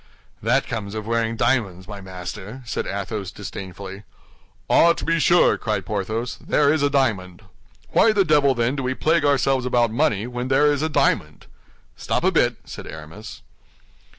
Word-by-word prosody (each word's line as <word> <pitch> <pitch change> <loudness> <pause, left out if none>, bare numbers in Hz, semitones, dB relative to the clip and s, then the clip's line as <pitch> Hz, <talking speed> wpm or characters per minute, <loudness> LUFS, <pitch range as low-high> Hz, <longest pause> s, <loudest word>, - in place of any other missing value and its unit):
"That 120 +5 +2
comes 105 -2 -5
of 110 -1 -4
wearing 115 0 0
diamonds, 110 -7 0
my 105 -2 -8
master," 95 +6 -8
said 125 - -3
Athos, 100 0 -4
disdainfully. 95 0 -8 0.7
"Ah, 170 0 +5
to - - -6
be 165 0 +1
sure," 175 +2 +4
cried 110 -2 -2
Porthos, 110 +4 -3
"there 145 0 +2
is 155 - 0
a 145 - +3
diamond. 110 -9 -1 0.5
Why 225 - +5
the 200 -3 +2
devil, 145 -4 +3
then, 120 +3 0
do 135 - -3
we 130 0 -2
plague 160 +2 +2
ourselves 135 -2 +2
about 120 -2 +2
money, 110 -2 +1
when 125 0 -4
there 145 +3 +4
is 145 - -2
a 160 - 0
diamond?" 150 - 0 0.5
"Stop - - -2
a - - +3
bit!" - - +2
said - - -9
Aramis. 80 +7 -10
120 Hz, 170 wpm, -22 LUFS, 100-140 Hz, 0.7 s, Ah